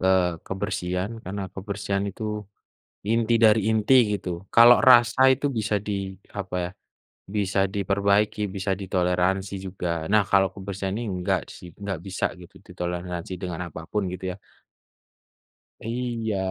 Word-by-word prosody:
eee, 90 Hz, -3 st, +2 dB
kebersihan 95 Hz, 0 st, -2 dB
karena 100 Hz, +2 st, -4 dB
kebersihan 100 Hz, 0 st, -3 dB
itu 105 Hz, +3 st, -6 dB, 0.9 s
inti 115 Hz, 0 st, +2 dB
dari 110 Hz, 0 st, +6 dB
inti 110 Hz, +4 st, +3 dB, 0.2 s
gitu, 95 Hz, -, -6 dB, 0.3 s
kalau 120 Hz, +1 st, +9 dB
rasa 120 Hz, -1 st, +6 dB
itu 140 Hz, +3 st, -3 dB
bisa 105 Hz, -1 st, 0 dB
di -, -, -1 dB, 0.5 s
apa 95 Hz, -2 st, -4 dB
ya, 85 Hz, -, -3 dB, 0.7 s
bisa 100 Hz, -1 st, 0 dB
diperbaiki 100 Hz, +2 st, +1 dB, 0.2 s
bisa 95 Hz, 0 st, -1 dB
ditoleransi 95 Hz, +1 st, 0 dB
juga, 95 Hz, -1 st, -5 dB, 0.3 s
nah 105 Hz, -, +6 dB
kalau 95 Hz, -1 st, +5 dB
kebersihan 95 Hz, -1 st, -4 dB
ini 120 Hz, -, -3 dB
enggak 90 Hz, -1 st, 0 dB, 0.2 s
sih, 90 Hz, -, -11 dB
enggak 95 Hz, -5 st, -3 dB
bisa 95 Hz, -1 st, -2 dB, 0.2 s
gitu 85 Hz, -, -15 dB
ditoleransi 90 Hz, 0 st, -4 dB
dengan 90 Hz, -2 st, -4 dB
apa 80 Hz, -, -6 dB
pun 105 Hz, -2 st, 0 dB
gitu 90 Hz, +1 st, -8 dB
ya. -, -, -7 dB, 1.5 s
Iya. 115 Hz, -2 st, -2 dB
100 Hz, 135 wpm, -25 LUFS, 90-105 Hz, 1.5 s, kalau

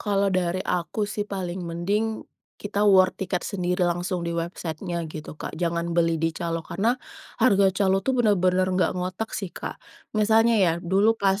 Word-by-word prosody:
Kalau 200 Hz, -1 st, +1 dB
dari 185 Hz, 0 st, 0 dB
aku 180 Hz, +4 st, -1 dB
sih, 205 Hz, 0 st, -4 dB
paling 185 Hz, -2 st, -4 dB
mending 200 Hz, +6 st, -2 dB, 0.4 s
kita 205 Hz, 0 st, -1 dB
war 190 Hz, -2 st, +6 dB
tiket 185 Hz, -1 st, -3 dB
sendiri 180 Hz, -2 st, -1 dB
langsung 175 Hz, +1 st, -2 dB
di 170 Hz, 0 st, -3 dB
website-nya 170 Hz, 0 st, -4 dB
gitu, 155 Hz, 0 st, -8 dB
Kak. -, -, -6 dB
Jangan 170 Hz, 0 st, -1 dB
beli 165 Hz, -1 st, +3 dB
di 165 Hz, -, +2 dB
calo, 165 Hz, -1 st, -3 dB
karena 230 Hz, +5 st, 0 dB, 0.4 s
harga 200 Hz, -5 st, +5 dB
calo 195 Hz, 0 st, +2 dB
tuh 265 Hz, -1 st, +1 dB
bener-bener 185 Hz, -4 st, +3 dB
nggak 185 Hz, -2 st, +1 dB
ngotak 185 Hz, +5 st, -3 dB
sih, 195 Hz, -4 st, -4 dB
Kak. -, -, -6 dB, 0.4 s
Misalnya 225 Hz, +2 st, +4 dB
ya 175 Hz, -3 st, +4 dB
dulu 200 Hz, +6 st, +2 dB
pas, 195 Hz, -1 st, +1 dB
185 Hz, 170 wpm, -25 LUFS, 175-205 Hz, 0.4 s, war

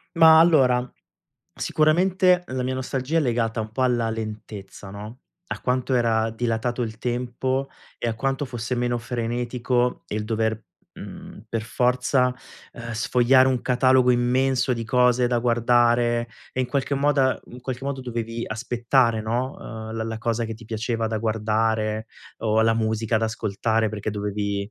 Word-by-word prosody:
Ma 160 Hz, -1 st, +8 dB
allora, 130 Hz, -7 st, +4 dB, 0.6 s
sicuramente 180 Hz, +3 st, +2 dB
la 130 Hz, 0 st, -3 dB
mia 130 Hz, +1 st, -1 dB
nostalgia 130 Hz, +4 st, -1 dB
è -, -, +4 dB
legata 115 Hz, -4 st, 0 dB
un 110 Hz, -, -5 dB
po' 130 Hz, -, -1 dB
alla 120 Hz, -3 st, +1 dB
lentezza, 105 Hz, -3 st, -7 dB
no, 105 Hz, +5 st, -9 dB, 0.3 s
a -, -, -5 dB
quanto 130 Hz, +1 st, -1 dB
era 115 Hz, -2 st, +2 dB
dilatato 120 Hz, +1 st, -2 dB
il 110 Hz, -2 st, -3 dB
tempo, 125 Hz, +3 st, -2 dB, 0.3 s
e 120 Hz, -, -2 dB
a 115 Hz, -, -1 dB
quanto 135 Hz, +4 st, -1 dB
fosse 120 Hz, -1 st, -4 dB
meno 120 Hz, 0 st, 0 dB
frenetico 120 Hz, +1 st, -1 dB
il 105 Hz, 0 st, -3 dB
dover, 110 Hz, 0 st, -1 dB, 0.3 s
mhmm, -, -, -10 dB
per 115 Hz, -, -2 dB
forza, 125 Hz, +2 st, +1 dB, 0.4 s
ehm, 115 Hz, 0 st, -7 dB
sfogliare 125 Hz, +4 st, +4 dB
un 130 Hz, -2 st, 0 dB
catalogo 130 Hz, 0 st, +3 dB
immenso 125 Hz, +2 st, +2 dB
di 115 Hz, -, -2 dB
cose 125 Hz, +1 st, +3 dB
da 120 Hz, 0 st, +1 dB
guardare. 120 Hz, 0 st, +2 dB, 0.3 s
E 130 Hz, -, 0 dB
in 130 Hz, -, 0 dB
qualche 140 Hz, 0 st, -1 dB
moda 140 Hz, -2 st, +2 dB
in 125 Hz, +1 st, -11 dB
qualche 130 Hz, +1 st, -5 dB
modo 140 Hz, -1 st, -3 dB
dovevi 115 Hz, -2 st, -4 dB
aspettare, 115 Hz, +1 st, +1 dB
no, 120 Hz, +5 st, -2 dB
ehm, 110 Hz, -1 st, -7 dB
la 110 Hz, 0 st, -2 dB
la 110 Hz, 0 st, -4 dB
cosa 115 Hz, +1 st, -1 dB
che 115 Hz, -, -5 dB
ti 115 Hz, +2 st, -13 dB
piaceva 115 Hz, +1 st, -2 dB
da 110 Hz, 0 st, -2 dB
guardare, 110 Hz, 0 st, 0 dB, 0.3 s
o 110 Hz, 0 st, +2 dB
la 115 Hz, 0 st, +3 dB
musica 110 Hz, 0 st, 0 dB
da 110 Hz, -, 0 dB
ascoltare, 110 Hz, 0 st, -1 dB
perché 105 Hz, 0 st, -5 dB
dovevi 100 Hz, 0 st, -3 dB
120 Hz, 160 wpm, -24 LUFS, 110-130 Hz, 0.6 s, Ma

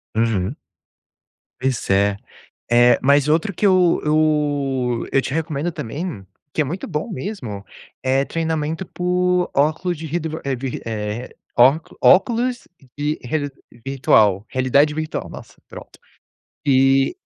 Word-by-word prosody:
Uhum. 110 Hz, 0 st, 0 dB, 1.0 s
Pois 130 Hz, -1 st, -2 dB
é, 100 Hz, +1 st, +2 dB, 0.5 s
eh, 120 Hz, +1 st, +5 dB
mas 140 Hz, +1 st, +4 dB
outro 165 Hz, +7 st, +1 dB
que -, -, -1 dB
eu 185 Hz, -3 st, +4 dB
eu 145 Hz, -5 st, +1 dB
eu 135 Hz, -, +3 dB
te 135 Hz, -, -4 dB
recomendo 160 Hz, +1 st, -2 dB
também, 145 Hz, -, -5 dB, 0.3 s
que -, -, +1 dB
é -, -, +3 dB
muito 170 Hz, +7 st, -5 dB
bom 160 Hz, +5 st, -3 dB
mesmo, 150 Hz, -, -6 dB, 0.4 s
é 130 Hz, +1 st, +2 dB
treinamento 160 Hz, +2 st, -2 dB
por 180 Hz, 0 st, 0 dB
óculos 160 Hz, +5 st, +1 dB
de 160 Hz, -, -7 dB
red 160 Hz, +3 st, -2 dB
de 160 Hz, -, -4 dB, 0.2 s
rev 135 Hz, -1 st, -3 dB
eh 110 Hz, +1 st, -3 dB
eh, -, -, -20 dB, 0.2 s
ócu 135 Hz, +7 st, +4 dB
óculos 240 Hz, +5 st, +3 dB, 0.3 s
de 150 Hz, +1 st, -1 dB
reali 145 Hz, +3 st, -2 dB, 0.4 s
virtual 110 Hz, -7 st, +3 dB
realidade 140 Hz, +4 st, +2 dB
virtual, 155 Hz, +1 st, -4 dB
nossa! -, -, -11 dB
Pronto, -, -, -12 dB, 0.7 s
e 135 Hz, 0 st, +3 dB
145 Hz, 130 wpm, -21 LUFS, 125-165 Hz, 1.0 s, eh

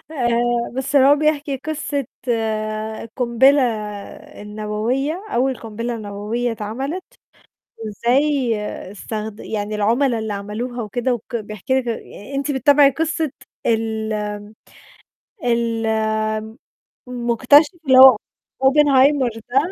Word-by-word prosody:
آآ، 240 Hz, -4 st, 0 dB
بس 270 Hz, +2 st, -1 dB
هو 275 Hz, +1 st, +6 dB
بيحكي 295 Hz, -2 st, 0 dB
قصّة 285 Hz, -1 st, -3 dB, 1.1 s
قُنبلة 265 Hz, +3 st, +4 dB, 0.8 s
النووية، 215 Hz, -, -2 dB
أول 260 Hz, +1 st, +1 dB
قُنبلة 230 Hz, +2 st, -5 dB
نووية 215 Hz, +3 st, -3 dB
اتعملِت، 265 Hz, -, -4 dB, 0.7 s
وإزاي 245 Hz, +4 st, +1 dB, 0.4 s
استخد 215 Hz, +1 st, -6 dB
يعني 210 Hz, -1 st, -4 dB
العُملا 230 Hz, +4 st, +1 dB
اللي 220 Hz, -1 st, -3 dB
عملوها 220 Hz, +5 st, -5 dB
وكده 245 Hz, +4 st, -1 dB
وك 240 Hz, +1 st, -6 dB
بيحكي 215 Hz, +4 st, -2 dB
لِك 245 Hz, -, -6 dB
آآ، 230 Hz, +2 st, -6 dB
أنتِ 280 Hz, +2 st, -1 dB
بتابعي 280 Hz, +1 st, +5 dB
قصة 315 Hz, 0 st, -1 dB, 0.3 s
ال 220 Hz, -1 st, 0 dB, 1.3 s
ال 230 Hz, -1 st, 0 dB, 1.2 s
مُكتشِف 250 Hz, -, +3 dB
اللي 260 Hz, -, +6 dB
هو 265 Hz, 0 st, +10 dB, 0.5 s
Oppenheimer 270 Hz, -3 st, +4 dB
ده 260 Hz, -, +1 dB
245 Hz, 95 wpm, -20 LUFS, 220-275 Hz, 1.3 s, هو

